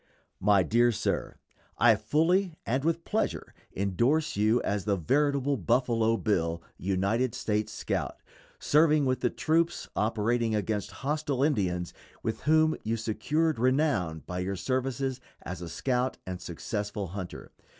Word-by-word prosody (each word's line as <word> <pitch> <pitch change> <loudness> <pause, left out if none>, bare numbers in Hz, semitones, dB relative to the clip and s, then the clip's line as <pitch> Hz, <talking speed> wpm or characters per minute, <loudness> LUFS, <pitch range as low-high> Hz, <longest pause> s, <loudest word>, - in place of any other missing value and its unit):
_ - - -39 0.4
MY 100 -1 +4
DEAR 120 +5 +3
SIR: 110 - -2 0.4
I 120 -1 +6
fully, 160 - +1
and 130 +4 0
with 165 +1 0
pleasure, 220 - -2 0.2
indorse 120 - +1
you 110 +4 +3
as 100 -1 -1
the 100 -2 +2
veritable 140 - +1
Buffalo 115 +2 +2
Bill, 85 -7 0 0.2
United 100 +7 0
States 105 -1 -1
scout, - - -3 0.4
serving 150 -1 +4
with 130 0 +1
the 125 - +1
troops 165 +5 0
operating 115 +1 +1
against 105 0 -1 0.2
hostile 145 -2 0
Indians, 90 - 0 0.3
with 110 -1 -2
whom 155 +1 +4
you 115 +1 -1
secured 135 +8 0
renown 125 - +1
by 90 0 -4
your 95 +2 -2
services 130 +4 -2 0.2
as 90 0 -6
a 85 - -6
scout 125 +6 -1
and 90 -1 -5
successful 100 +2 -4
hunter. 95 -1 -7
115 Hz, 140 wpm, -28 LUFS, 100-140 Hz, 0.4 s, I